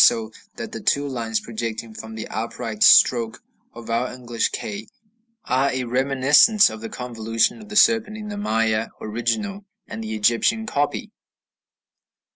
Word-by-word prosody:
So 110 -1 +3 0.2
that - - -7
the - - -7
two 145 0 +1
lines 115 -4 -2
projecting 115 -1 -5
from 110 0 -9
the 110 - -6
upright 115 -1 -5
stroke 115 -3 +5 0.3
of 115 -1 -8
our 120 +2 0
English 120 -2 -2
K 105 +1 -6 0.6
are 130 +2 +2
a 130 -1 -2
reminiscence 135 - +4
of 110 0 -9
the 115 - -6
convolution 115 - -1
of 215 - -13
the 210 - -7
serpent 225 0 +4
in 215 -1 -7
the 205 - -5
Maya 115 - 0
original 120 - -3 0.2
and 110 +1 -6
the 110 0 -4
Egyptian 120 - +2
copy. 145 -8 -2
120 Hz, 150 wpm, -22 LUFS, 110-140 Hz, 0.6 s, stroke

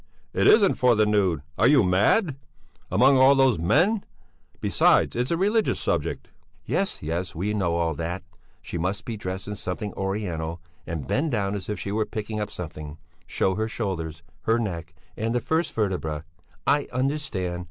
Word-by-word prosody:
"It - - +3
isn't 205 -4 +5
for 125 -2 +5
the 110 0 +4
nude! 95 -7 +1 0.2
Are - - +5
you 140 -3 +6
mad? 105 - +3 0.5
Among 135 +1 +5
all 135 +2 +7
those 135 -8 +4
men... 195 - +3 0.6
besides, - - +3
it's 125 +2 0
a 170 - +1
religious 210 +5 +2
subject." - - -2 0.4
"Yes, 195 - -1
yes, 85 +4 -3
we 100 +6 -1
know 90 -5 0
all 85 -1 +1
that. 85 +5 -4 0.4
She 85 - -5
must 95 +4 -2
be 115 - -4
dressed 95 -2 -5
in 105 - -3
something 100 +1 -4
Oriental, 90 -5 -3 0.3
and 80 -6 -4
bend 150 - +1
down 100 -4 0
as 100 -2 -5
if 105 -3 -3
she 100 - -4
were 110 +1 0
picking 105 0 -4
up 105 0 -2
something, 75 -4 -7 0.3
show 95 - +1
her 110 +3 -1
shoulders, 85 -8 -4 0.2
her 115 +1 +3
neck, 85 -7 -4 0.2
and 115 +2 -1
the - - +3
first 160 +6 0
vertebra, 85 -8 -2 0.4
I 140 0 +2
understand. 130 -10 -2
105 Hz, 175 wpm, -25 LUFS, 85-125 Hz, 0.6 s, all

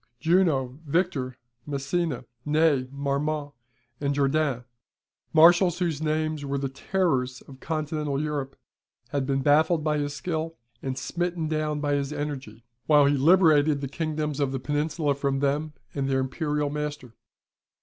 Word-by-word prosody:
Junot, 155 -7 +2
Victor, 140 -6 0 0.3
Massena, 140 -1 -2 0.2
Ney, 150 -3 +2
Marmont, 145 +1 -2 0.5
and 140 -1 0
Jourdain, 140 -2 +1 0.7
marshals 175 +2 +6
whose 165 -5 -1
names 155 -1 -1
were 140 0 -2
the 135 0 -2
terrors 135 -4 -1
of 130 -1 -14
continental 150 -2 -2
Europe 145 -3 -3 0.5
had 140 -2 -1
been 135 -1 0
baffled 155 +3 +4
by 150 -1 +1
his 145 0 -2
skill, 165 0 -3 0.2
and 130 -1 -3
smitten 170 +4 -2
down 155 -1 -1
by 145 -1 0
his 140 0 -1
energy, 140 -7 -5 0.2
while 150 -2 +6
he 140 - +4
liberated 155 -1 +5
the 140 - -3
kingdoms 150 0 -3
of 140 -2 +1
the 135 - -2
Peninsula 150 +2 0
from 140 -1 -1
them 145 +2 0 0.2
and 135 -1 -1
their 135 0 +2
Imperial 150 +2 -1
master. 150 -5 -4
145 Hz, 140 wpm, -26 LUFS, 140-155 Hz, 0.7 s, marshals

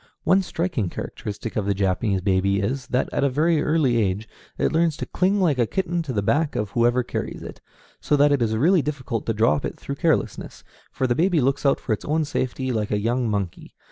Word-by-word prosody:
One 190 +1 +4
striking 170 - -2
characteristic 105 +5 -6
of 105 -2 -1
the 100 - +1
Japanese 95 +1 0
baby 100 +1 +1
is, 130 +6 -2
that 125 - 0
at - - 0
a 140 - +3
very 155 +4 +2
early 150 -7 +2
age 105 0 0 0.3
it - - +1
learns 160 -2 +1
to - - -4
cling 190 +3 +1
like 155 -9 +2
a 120 - +3
kitten 175 - -1
to 155 -5 -5
the 105 -5 -1
back 145 +7 +1
of 105 -1 -2
whoever 120 +2 +2
carries - - -5
it, - - -9 0.4
so 150 - +1
that 145 0 +4
it 140 -3 +2
is 110 -1 +1
really 170 - +4
difficult 135 -5 -4
to 115 - +1
drop 115 +6 +2
it - - -4
through 140 - -6
carelessness, 165 -1 -1 0.3
for 130 - -1
the 120 - +2
baby 170 +4 +2
looks 140 +2 +1
out 135 - +3
for 115 - -1
its 105 - -4
own 155 +1 0
safety 130 -1 -2
like 110 -3 -1
a 105 - +1
young 120 +3 0
monkey. 100 -4 -4
130 Hz, 225 wpm, -23 LUFS, 110-155 Hz, 0.4 s, One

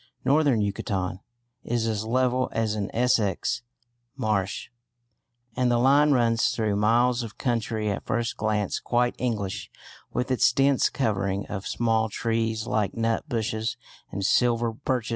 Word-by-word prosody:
Northern 140 -4 +3
Yucatan 95 -2 -2 0.4
is 120 -1 -1
as 110 -1 -1
level 125 +2 +1
as 110 -2 0
an 105 -1 -2
Essex 115 -4 +1 0.5
marsh, 105 -6 -1 0.9
and 125 -1 +2
the 120 - +3
line 140 +4 +5
runs 115 -3 +3
through 110 -3 0
miles 120 +4 +3
of 115 -3 -8
country 115 -3 -1
at 100 - -5
first 120 0 -1
glance 105 -2 -1
quite 120 0 +1
English 105 -6 -2 0.4
with 130 +1 -2
its 125 - +4
dense 135 +1 +3
covering 100 -5 -1
of 100 -1 -5
small 115 -1 +1
trees 115 0 -1
like 105 -5 -1
nut 115 +5 -1
bushes 110 -2 -2 0.3
and 100 0 -3
silver 120 +1 +2
birches. 125 -1 -2
115 Hz, 140 wpm, -26 LUFS, 105-125 Hz, 0.9 s, line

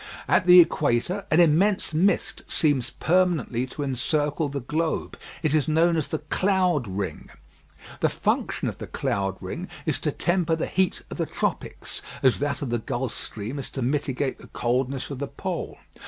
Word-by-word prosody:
At 180 - +3
the 180 0 +10
equator, 165 +3 +2
an 155 - +4
immense 175 +3 +3
mist 185 +6 +1
seems 140 -5 +1
permanently 165 -8 +1
to 145 +3 -5
encircle 145 +3 0
the 140 0 -3
globe. 155 +5 -2 0.3
It 155 -2 +2
is 155 -1 +2
known 165 +2 +3
as 160 -3 0
the 160 - -2
cloud 180 - +1
ring. 95 0 -4 0.7
The - - +3
function - - -1
of - - -4
the - - -6
cloud 95 -1 -1
ring 165 - -5 0.2
is 155 - 0
to 150 - 0
temper 175 +1 +1
the 160 - -2
heat 190 -1 0
of - - -5
the - - 0
tropics, - - -3 0.2
as 130 -2 +4
that 140 0 -1
of 130 - -3
the 120 - +1
Gulf 125 0 -3
stream 115 +7 -5
is 135 - -5
to 135 - -4
mitigate 135 0 -1
the - - -13
coldness 130 +3 -1
of 135 - -5
the 140 - -2
Pole. - - -5
145 Hz, 175 wpm, -25 LUFS, 130-165 Hz, 0.7 s, the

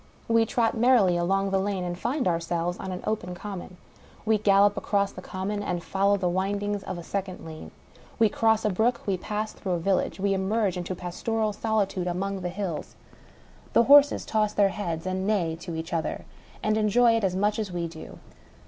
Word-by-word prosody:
We 230 0 +3
trot 230 0 +1
merrily 225 -6 +4
along 195 +3 +1
the 195 - +2
lane, 195 -1 -1
and 175 0 -3
find 260 - -1
ourselves 170 0 -1
on 190 - -5
an 180 - -6
open 180 -5 -2
common. 185 -2 -7 0.5
We 220 -1 +3
gallop 205 0 +4
across 200 -2 0
the - - -9
common, 200 +2 -4
and 180 -4 -3
follow 200 +1 +2
the 185 -2 -1
windings 200 +3 -1
of 185 - -5
a 170 - -7
second 190 -1 -4
lane. 160 -1 -9 0.5
We 225 - +5
cross 220 +1 +2
a 210 - +2
brook, 230 +6 +1
we 195 - +1
pass 210 +3 -4
through 190 -3 -3
a - - +1
village, 190 +2 0
we 200 +1 +1
emerge 195 0 0
into 180 +1 -4
pastoral 215 +5 -2
solitudfe 200 -4 -1
among 195 +2 -2
the 180 - -2
hills. 185 -3 -5 0.8
The 235 - +6
horses 285 +3 +6
toss 215 -1 0
their 200 -1 +4
heads, 170 -5 -4
and 190 +1 -2
neigh 175 -7 +1
to 170 0 -7
each 160 +2 -5
other, 165 -1 -2 0.4
and 215 0 +2
enjoy 230 +2 +4
it 225 - 0
as 185 -2 +1
much 205 +3 +1
as 210 -4 -3
we 175 -1 -2
do. 160 -1 -10
195 Hz, 195 wpm, -26 LUFS, 180-215 Hz, 0.8 s, The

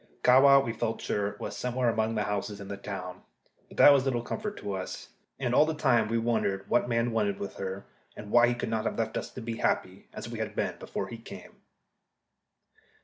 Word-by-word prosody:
Kahwa, 135 +2 +7
we 115 - -2
felt 115 0 -2
sure, 100 0 -2
was - - -5
somewhere 125 0 -1
among 110 0 +1
those 105 - 0
houses 105 0 -3
in 100 -1 -9
the 100 - -4
town. 95 -3 -7 0.5
But - - -15
that 145 - +9
was 135 -2 +3
little 125 -3 -1
comfort 210 - -4
to 100 - -4
us. 95 -1 -6 0.3
And 125 -3 -1
all 150 - +5
the 160 - -1
time 125 -7 +3
we 115 +1 0
wondered 110 -4 0
what 120 - +1
man 115 0 +1
wanted 105 -3 0
with 100 - -6
her, 95 +1 -5 0.3
and 105 - -8
why 120 0 +6
he 120 - +1
could 120 - -4
not 110 -1 -1
have - - -2
left 110 -1 -2
us - - -3
to 125 - -7
be 115 0 -4
happy, - - -1
as - - -7
we - - -6
had - - -4
been - - -2
before - - -4
he - - -8
came. - - -11
115 Hz, 220 wpm, -29 LUFS, 100-125 Hz, 0.5 s, that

